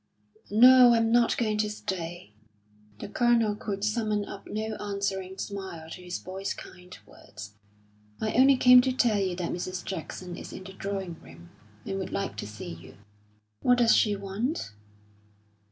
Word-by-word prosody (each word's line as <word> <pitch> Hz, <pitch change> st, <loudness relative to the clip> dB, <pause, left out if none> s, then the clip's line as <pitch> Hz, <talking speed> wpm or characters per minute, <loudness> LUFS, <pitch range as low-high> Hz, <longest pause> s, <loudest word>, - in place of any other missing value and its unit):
"No, 245 Hz, +2 st, +7 dB
I'm 225 Hz, 0 st, +2 dB
not 235 Hz, 0 st, +3 dB
going 215 Hz, -3 st, 0 dB
to 210 Hz, 0 st, +1 dB
stay." 175 Hz, -, -6 dB, 0.6 s
The -, -, -7 dB
Colonel 230 Hz, -1 st, +2 dB
could 200 Hz, -1 st, -5 dB
summon 215 Hz, -1 st, 0 dB
up 200 Hz, -, -10 dB
no 220 Hz, +1 st, -3 dB
answering 195 Hz, -2 st, -3 dB
smile 190 Hz, -6 st, -6 dB
to 180 Hz, -, -8 dB
his 180 Hz, 0 st, -5 dB
boy's 190 Hz, +2 st, -5 dB
kind 180 Hz, 0 st, -12 dB
words. 110 Hz, 0 st, -12 dB, 0.7 s
"I 215 Hz, -, -2 dB
only 265 Hz, +2 st, +5 dB
came 250 Hz, 0 st, +8 dB
to 260 Hz, 0 st, 0 dB
tell 235 Hz, -5 st, +2 dB
you 190 Hz, -2 st, -1 dB
that 175 Hz, -1 st, -3 dB
Mrs. 180 Hz, +1 st, -4 dB
Jackson 180 Hz, 0 st, -6 dB
is -, -, -9 dB
in -, -, -8 dB
the 190 Hz, 0 st, -10 dB
drawing 195 Hz, -4 st, -5 dB
room, 85 Hz, +1 st, -15 dB, 0.3 s
and 195 Hz, 0 st, -3 dB
would 190 Hz, -, -5 dB
like 195 Hz, -, -3 dB
to -, -, -5 dB
see 105 Hz, -4 st, -8 dB
you." 80 Hz, -1 st, -13 dB, 0.7 s
"What 245 Hz, 0 st, +4 dB
does 235 Hz, -2 st, +5 dB
she 210 Hz, -2 st, +3 dB
want?" 200 Hz, -, -3 dB
200 Hz, 165 wpm, -27 LUFS, 180-225 Hz, 0.7 s, came